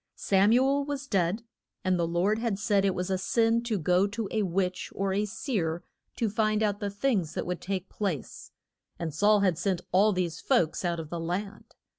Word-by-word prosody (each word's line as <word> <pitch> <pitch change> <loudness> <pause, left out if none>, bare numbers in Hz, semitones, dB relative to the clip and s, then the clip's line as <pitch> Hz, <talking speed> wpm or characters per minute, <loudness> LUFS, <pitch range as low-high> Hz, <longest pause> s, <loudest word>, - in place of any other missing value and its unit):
Sam 195 +2 +3
u 250 +3 +5
el 280 +1 +1
was 285 -1 -4
dead, 195 -2 0 0.4
and 185 -1 +1
the 170 - +1
Lord 185 +6 +1
had 230 -4 -1
said 205 -2 +2
it 195 - +1
was 180 +1 -2
a 190 - 0
sin 230 +4 +2
to 225 -3 0
go 180 +3 +2
to 210 +1 -4
a 220 - +1
witch, 185 -1 -1
or 195 0 0
a 205 +2 +1
seer, 185 - -2 0.3
to 230 - 0
find 215 +1 +1
out 205 -1 0
the 205 -2 -2
things 200 - -1
that - - -2
would 180 0 -3
take 190 -1 -3
place, 190 - -4 0.5
and 160 -3 -4
Saul 205 +5 +4
had 180 -4 +2
sent 185 -1 0
all 200 +4 +5
these 180 -4 -2
folks 165 +1 +1
out 170 -1 -1
of 155 -2 -7
the 170 - -3
land. 180 +5 -5
195 Hz, 210 wpm, -28 LUFS, 180-215 Hz, 0.5 s, u